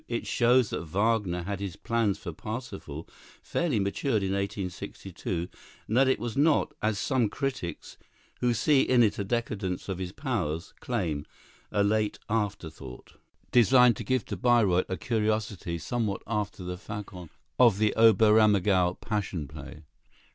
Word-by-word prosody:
It 120 -1 -3
shows 120 -1 +3
that - - -2
Wagner 95 +1 0
had 100 +1 -4
his 100 -4 -5
plans 115 -4 0
for 85 - -7
"Parsifal" 100 - -7 0.4
fairly 155 -10 0
matured 105 +3 0
in 95 - -1
1862, 95 -2 -4 0.4
and 110 - -2
that 135 +1 +5
it 130 - +3
was 120 -2 -5
not, 150 +2 +3
as 110 -1 0
some 125 0 +1
critics, 130 -7 -4 0.4
who 125 - +2
see 135 +5 +3
in 125 -2 +4
it 105 - +1
a - - 0
decadence 100 -4 -3
of 95 -1 -3
his 90 -1 -4
powers, 95 - -3
claim, 85 -12 -2 0.4
a 105 -1 +2
late 105 0 +1
afterthought, 85 - -4 0.3
designed 125 0 +6
to - - -5
give 130 -2 0
to - - -4
Bayreuth 110 -7 +3
a 95 - -2
curiosity 105 -5 -1
somewhat 105 +4 -2
after 105 -4 -3
the 90 0 -5
façon 95 -3 -8 0.3
of 120 -6 +6
the 105 0 +2
Oberammergau 105 -4 +5
"Passion 95 -8 -3
Play." 75 +3 -10
105 Hz, 145 wpm, -28 LUFS, 90-115 Hz, 0.4 s, designed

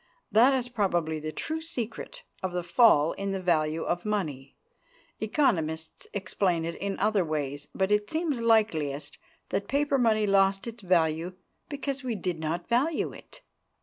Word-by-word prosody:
That 235 +5 +6
is 250 -2 -1
probably 175 -9 0
the 155 +1 -4
true 315 - -3
secret 245 -9 -5 0.2
of 185 -1 -3
the 180 -1 -1
fall 175 -4 +5
in 195 0 -3
the 195 - -2
value 160 -3 +1
of 175 0 -1
money. 155 -11 -3 0.6
Economists 165 - 0
explain 185 -4 0
it 170 - -3
in 200 0 -3
other 210 -2 +2
ways. 145 -3 -3
But 190 +1 +1
it 210 0 +2
seems 315 -6 -1
likeliest 160 -11 +1 0.3
that 200 - -2
paper 285 0 +1
money 220 -3 +3
lost 195 -1 +3
its 235 -1 -7
value 170 -1 +1 0.4
because 280 -1 -4
we 245 -3 -2
did 180 -4 -3
not 165 +2 -3
value 270 +7 +1
it. - - -14
195 Hz, 155 wpm, -28 LUFS, 160-235 Hz, 0.6 s, That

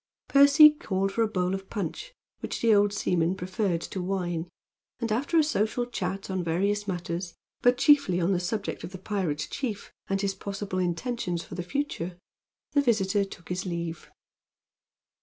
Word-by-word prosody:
Percy 285 +2 +8
called 195 -9 -2
for 230 - -1
a 225 - +4
bowl 185 -3 -1
of 195 0 -5
punch, 215 - -5 0.2
which - - -4
the 230 -2 +4
old 205 0 +4
seaman 180 -3 +1
preferred 185 -1 -1
to 185 - -5
wine, 180 -2 -2 0.5
and 230 -2 -2
after 275 +9 +1
a 315 - +6
social 240 -4 0
chat 195 -5 -4
on 190 -2 -2
various 200 +5 0
matters, 175 -1 -4 0.3
but 245 0 +4
chiefly 280 -11 +4
on 175 +2 +1
the 185 - +2
subject 200 +3 -3
of 185 - -7
the - - -5
pirate 185 -6 -2
chief, 225 -7 -4 0.2
and 195 0 0
his 200 -1 0
possible 195 -1 -4
intentions 180 0 -2
for - - -11
the 175 - -3
future, 180 -5 -3 0.5
the 285 - +4
visitor 205 -6 +2
took 185 -3 -10
his 180 +1 -3
leave. 170 -2 -4
195 Hz, 170 wpm, -27 LUFS, 180-225 Hz, 0.5 s, Percy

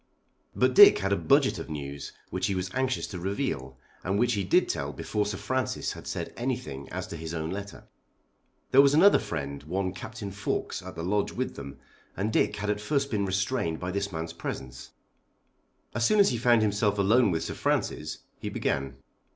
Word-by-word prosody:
But - - +3
Dick 410 0 +9
had - - 0
a - - +4
budget 140 -1 +3
of - - -7
news 70 -2 -6 0.2
which - - -1
he 100 - -1
was 90 0 -3
anxious 130 0 0
to 95 -4 -7
reveal, 85 - -3 0.3
and 95 +2 0
which 120 +2 +2
he 100 -2 0
did 95 - +3
tell - - -2
before 105 -1 -2
Sir 100 -2 -3
Francis 130 +4 -2
had - - -10
said - - -4
anything 120 - -4
as - - -4
to - - -7
his 80 +1 -5
own 80 0 -3
letter. 100 +1 -7 0.8
There 135 - +8
was 140 +1 +4
another 195 +6 +7
friend, 70 -3 -4
one 95 +5 -2
Captain 100 +1 -7
Fawkes, 100 +1 -3
at - - -9
the 85 - -5
Lodge 100 +3 0
with - - -2
them, 70 - -8 0.4
and 105 +3 -1
Dick - - +2
had 105 +1 -1
at 105 0 -3
first 140 +4 0
been 100 -3 0
restrained 95 -3 -1
by 90 0 -3
this 100 +1 -2
man's 80 -1 -4
presence. 65 -6 -6 1.0
As 120 - -1
soon 215 - +4
as 200 - +6
he 120 - -1
found 120 -2 +4
himself 105 0 +1
alone 105 +4 +4
with 80 -2 -1
Sir - - -4
Francis - - -2 0.2
he - - -4
began. 70 -1 -2
100 Hz, 200 wpm, -28 LUFS, 80-120 Hz, 1.0 s, Dick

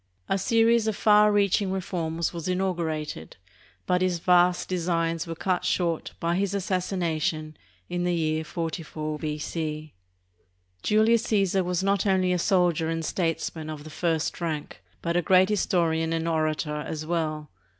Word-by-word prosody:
A 195 - +1
series 230 +2 +3
of 220 - 0
far 210 0 +5
reaching 200 -1 +2
reforms 170 -3 -2
was 170 -1 -5
inaugurated, 170 - -2 0.5
but 180 0 +1
his 185 -1 +1
vast 180 +1 +3
designs 165 -2 -1
were 165 - -4
cut 180 +2 -1
short 170 -3 -1
by 170 0 0
his 200 +1 0
assassination 170 -5 -1 0.3
in 175 0 -2
the 175 0 +1
year 155 -1 0
44 155 -1 -4
B.C. 155 0 -4 0.9
Julius 220 - +3
Caesar 195 -4 +2
was 180 +1 -1
not 200 0 +1
only 185 -1 +2
a 180 - 0
soldier 175 -3 +2
and 165 0 -2
statesman 165 -2 -2
of 155 -1 -6
the 155 - -10
first 165 +1 -1
rank, 155 -3 -4 0.2
but 170 0 -1
a 175 - +3
great 185 +2 +4
historian 165 -5 +1
and 165 0 -1
orator 155 -2 0
as 155 +1 -5
well. 155 -3 -2
170 Hz, 150 wpm, -26 LUFS, 160-185 Hz, 0.9 s, far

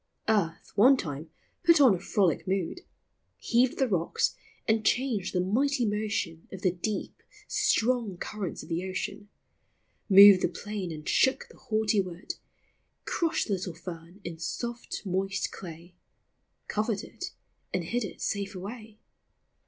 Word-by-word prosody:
Earth, 195 -7 0
one 255 +7 +7
time, 155 - -5 0.3
put 335 -3 +6
on 260 -7 +7
a 180 - -2
frolic 190 -3 +1
mood, 190 - -1 0.6
Heaved 245 +1 +2
the 265 - +2
rocks 175 -6 0 0.3
and 220 0 +2
changed 235 -6 +1
the 180 - 0
mighty 245 +8 +1
motion 205 -6 -2
Of 190 -1 -8
the 185 - +4
deep, 195 +4 -4 0.3
strong 245 - +1
currents 200 -1 -5
of - - -13
the 170 +2 -1
ocean; 200 +2 -4 0.8
Moved 200 -1 +10
the - - +3
plain 205 -4 -5
and 155 -1 -8
shook 265 - +3
the - - -17
haughty 215 -1 +1
wood, 180 -1 -6 0.7
Crushed 335 -2 0
the 210 - 0
little 180 -3 -3
fern 175 +2 -9
in 165 -1 -6
soft 235 +7 -4
moist 195 +1 -1
clay, 170 0 -10 0.4
— - - -48
Covered 215 -1 -1
it, 370 - -7 0.5
and 180 - -1
hid 235 +8 -1
it 200 - -7
safe 200 0 -2
away. 215 +3 -8
200 Hz, 145 wpm, -29 LUFS, 180-225 Hz, 0.8 s, Moved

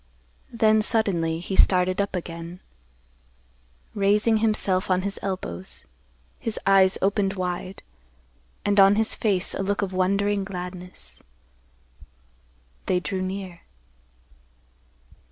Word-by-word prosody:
Then 220 -2 +3
suddenly, 180 -8 0
he 185 +3 -4
started 185 0 +4
up 200 -1 -3
again, 170 0 -6 1.3
raising 210 +2 +2
himself 210 -4 +1
on 185 0 +2
his 200 0 -3
elbows, 95 - -5 0.5
his 225 -2 -4
eyes 195 -1 +5
opened 200 0 +1
wide, 185 0 -4 0.8
and 205 0 +3
on 195 +1 +7
his 220 +1 +1
face 195 -5 +1
a - - -3
look 200 +1 -1
of 190 -1 -4
wondering 200 +2 +1
gladness. 180 - -7 1.7
They 180 - +2
drew 185 +1 -3
near. 185 -2 -5
195 Hz, 105 wpm, -24 LUFS, 180-205 Hz, 1.7 s, on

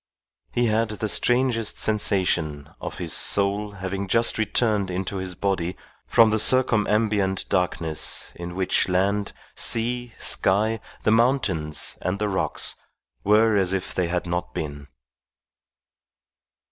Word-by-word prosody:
He 120 - +1
had 110 0 +1
the 110 0 -3
strangest 120 0 +1
sensation 90 -8 -1
of - - -6
his - - -3
soul 100 +1 +1
having 95 0 -4
just 115 +3 +2
returned 105 -2 +1
into 95 +2 -3
his 95 -1 -4
body 95 -2 -2 0.3
from 115 -1 +5
the 110 - +1
circumambient 105 -5 +2
darkness 85 -4 -1
in 85 0 -8
which 95 0 +1
land, 100 +3 0 0.2
sea, 120 +1 +1
sky, 110 +4 +2 0.2
the - - +2
mountains, 110 - +1
and 90 +2 -2
the 105 0 -1
rocks 95 - +1 0.5
were 105 +2 +4
as 95 -2 +1
if 95 -2 -3
they 90 -2 0
had 90 +1 -2
not 90 0 -4
been. 70 -2 -5
100 Hz, 125 wpm, -24 LUFS, 90-110 Hz, 0.5 s, from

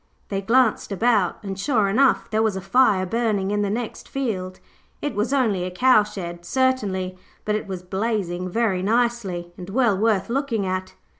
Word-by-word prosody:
They 195 -1 -2
glanced 230 +1 +2
about 200 -2 +2
and, 195 -1 -5
sure 215 -3 +2
enough, 255 +7 +3
there 220 0 +2
was 220 -3 +1
a - - -2
fire 195 -1 +3
burning 205 -2 0
in 205 0 +1
the 205 - 0
next 225 +2 -4
field. 190 -9 -3 0.4
It 290 - -3
was 210 +5 -1
only 225 -10 +1
a 180 - -2
cowshed, 190 -5 +1
certainly, 195 -6 0 0.3
but 210 - 0
it 215 - -2
was 185 -2 -5
blazing 185 -2 -2
very 200 -2 0
nicely, 205 -5 0
and 180 +1 -8
well 235 -1 +2
worth 210 -1 +1
looking 240 -4 -1
at. 185 0 -3
205 Hz, 170 wpm, -23 LUFS, 185-235 Hz, 0.4 s, enough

